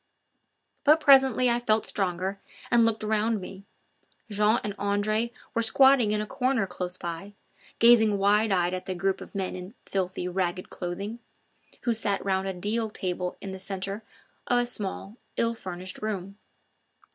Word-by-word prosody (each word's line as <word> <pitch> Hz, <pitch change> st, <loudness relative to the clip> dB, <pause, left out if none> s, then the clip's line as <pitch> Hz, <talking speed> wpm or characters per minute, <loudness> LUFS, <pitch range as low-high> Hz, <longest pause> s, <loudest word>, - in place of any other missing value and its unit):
But 300 Hz, +2 st, +6 dB
presently 265 Hz, -4 st, +5 dB
I 240 Hz, 0 st, +3 dB
felt 220 Hz, -2 st, +1 dB
stronger 190 Hz, 0 st, -2 dB, 0.3 s
and 235 Hz, -1 st, +5 dB
looked 225 Hz, -1 st, -1 dB
around 215 Hz, +1 st, +1 dB
me 195 Hz, +1 st, -9 dB, 0.7 s
again. -, -, -4 dB
Jean 210 Hz, +3 st, +3 dB
and 205 Hz, -, -3 dB
Andre 210 Hz, +3 st, 0 dB, 0.2 s
were 230 Hz, -, +1 dB
squatting 265 Hz, -1 st, +5 dB
in 210 Hz, 0 st, +1 dB
a 210 Hz, -, -2 dB
corner 255 Hz, -1 st, 0 dB
close 180 Hz, -1 st, -5 dB
by, 170 Hz, +4 st, -6 dB, 0.4 s
gazing 225 Hz, -3 st, +6 dB
wide 205 Hz, +2 st, +3 dB
eyed 180 Hz, -1 st, +2 dB
at 185 Hz, -, -5 dB
the 185 Hz, -, -2 dB
group 190 Hz, +2 st, -1 dB
of -, -, -11 dB
men 190 Hz, -2 st, -2 dB
in 185 Hz, +5 st, -9 dB
filthy, 185 Hz, -2 st, -2 dB
ragged 180 Hz, 0 st, -2 dB
clothing, 195 Hz, +6 st, -5 dB, 0.6 s
who 240 Hz, -, +2 dB
sat 205 Hz, -3 st, -1 dB
round 190 Hz, 0 st, 0 dB
a 190 Hz, -, -2 dB
deal 215 Hz, +5 st, -1 dB
table 180 Hz, -3 st, -3 dB
in 195 Hz, -, -6 dB
the 190 Hz, -, -7 dB
centre 195 Hz, +2 st, -4 dB, 0.5 s
of 245 Hz, -, +3 dB
a 245 Hz, -, +2 dB
small, 210 Hz, -2 st, -4 dB, 0.2 s
ill 230 Hz, 0 st, +1 dB
furnished 185 Hz, -3 st, -7 dB
room. 200 Hz, -2 st, -4 dB
205 Hz, 165 wpm, -27 LUFS, 190-225 Hz, 0.7 s, But